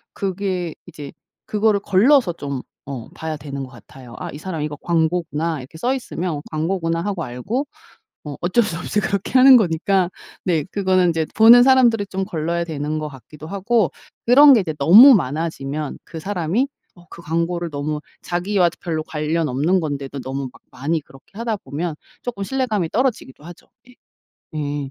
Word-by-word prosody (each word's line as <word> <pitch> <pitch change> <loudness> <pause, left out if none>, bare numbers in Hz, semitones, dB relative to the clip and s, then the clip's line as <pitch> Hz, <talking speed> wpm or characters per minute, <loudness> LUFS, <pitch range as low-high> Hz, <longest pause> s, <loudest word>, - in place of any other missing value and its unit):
그게 185 -3 -3
이제 145 -2 -9 0.3
그거를 210 -1 +1
걸러서 205 +2 +3
좀 140 -5 -5 0.2
어 130 -5 -7
봐야 160 -1 -4
되는 140 -1 -6
것 130 - -8
같아요. 125 0 -14
'아 - - -5
이 145 - -7
사람 165 -1 -5
이거 150 0 -3
광고구나. 165 -1 -1
이렇게 135 +5 -12
써 245 +10 0
있으면 180 - -4
광고구나.' 165 +1 -1
하고 195 -3 -3
알고 175 - -3 0.6
어 145 -2 -6
어쩔 180 +7 +3
수 185 -6 -3
없이 180 +4 -1
그렇게 200 -1 -2
하는 260 0 +9
거니까 185 -2 +1 0.3
네 165 -5 +1
그거는 185 -1 +1
인제 165 -2 +1
보는 235 +2 +8
사람들이 245 -5 +4
좀 190 0 -3
걸러야 170 +1 -2
되는 155 -1 -3
것 155 0 -4
같기도 150 +3 -12
하고 200 - +1 0.4
그런 280 +4 +8
게 240 - +6
이제 160 -5 -3
너무 225 - +9
많아지면 150 - -2
그 165 -2 -8
사람이 195 - -1 0.3
어 175 -1 -19
그 170 - -12
광고를 170 +1 -2
너무 150 +1 -3 0.2
자기와 180 +1 +1
별로 160 -2 -2
관련 155 +1 -2
없는 150 +9 +1
건데도 140 -3 -4
너무 135 0 -5
막 - - -19
많이 155 +5 -2
그렇게 155 +8 -17
하다 230 -2 -1
보면 155 0 -5 0.3
조금 235 -5 -5
신뢰감이 215 -8 -1
떨어지기도 235 - -2
하죠. 175 0 -13 0.2
예. 250 - -17 0.6
예. 145 -2 -3
170 Hz, 345 characters per minute, -20 LUFS, 150-200 Hz, 0.6 s, 하는